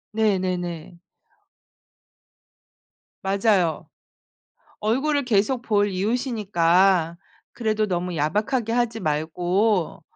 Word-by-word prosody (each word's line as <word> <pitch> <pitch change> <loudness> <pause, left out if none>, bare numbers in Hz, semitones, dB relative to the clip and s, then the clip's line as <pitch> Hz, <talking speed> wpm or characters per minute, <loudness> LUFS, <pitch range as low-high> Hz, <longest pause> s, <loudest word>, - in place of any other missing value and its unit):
네 215 -3 +2
네네. 175 -2 -4 2.2
맞아요. 195 -4 +1 0.9
얼굴을 275 +7 0
계속 230 +2 +1
볼 205 -3 +1
이웃이니까 190 - +1 0.3
그래도 215 -2 -1
너무 180 -2 -3
야박하게 210 - 0
하지 235 -2 0
말고 175 +5 0
200 Hz, 175 characters per minute, -23 LUFS, 175-225 Hz, 2.2 s, 네